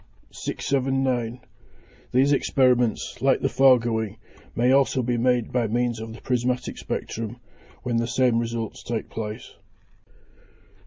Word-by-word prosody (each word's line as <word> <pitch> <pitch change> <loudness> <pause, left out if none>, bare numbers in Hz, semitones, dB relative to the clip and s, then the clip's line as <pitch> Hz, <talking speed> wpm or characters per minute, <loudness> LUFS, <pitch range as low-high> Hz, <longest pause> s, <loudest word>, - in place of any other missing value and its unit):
679. 130 -3 -1 0.7
These 135 +3 +4
experiments, 125 -5 +1
like 135 +1 +3
the 135 - +1
foregoing, 115 -5 +3 0.4
may 120 +2 +3
also 135 -1 +3
be 120 0 0
made 120 -1 +1
by 120 -2 +1
means 120 +1 0
of 110 0 -6
the 115 - -12
prismatic 125 0 -1
spectrum, 115 +1 -4 0.5
when 120 -2 0
the 115 0 0
same 125 -2 +2
results 115 -1 -4
take 115 -2 -4
place. 110 +1 -6
120 Hz, 120 wpm, -24 LUFS, 115-130 Hz, 0.7 s, These